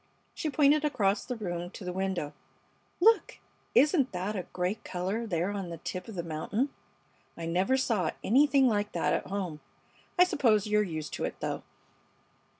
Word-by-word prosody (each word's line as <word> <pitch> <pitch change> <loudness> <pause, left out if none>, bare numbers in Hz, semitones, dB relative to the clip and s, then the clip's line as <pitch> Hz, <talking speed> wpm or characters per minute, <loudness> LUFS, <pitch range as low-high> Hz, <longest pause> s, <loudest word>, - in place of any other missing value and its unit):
She 310 - -2
pointed 295 +1 +4
across 205 -9 +1
the 250 - -4
room 175 -5 -4
to 190 - -10
the 180 - -3
window. 190 -5 -2 0.7
"Look! 445 +6 +4 0.4
Isn't 290 -2 +4
that 185 +4 -2
a 185 -3 -4
great 185 +4 -2
color 190 +6 -2
there 175 0 0
on 195 -3 -4
the 170 - -6
tip 180 +5 -5
of 220 - -8
the 170 - -2
mountain? 170 - -1 0.7
I 165 - -5
never 185 +10 +2
saw 215 -10 +1
anything 275 +3 +5
like 205 -3 0
that - - +1
at - - -1
home. 185 -6 -3 0.6
I 360 - +8
suppose 230 - +3
you're 210 0 +3
used 160 -6 -4
to - - -3
it, - - -5
though." - - -3
200 Hz, 170 wpm, -30 LUFS, 180-250 Hz, 0.7 s, I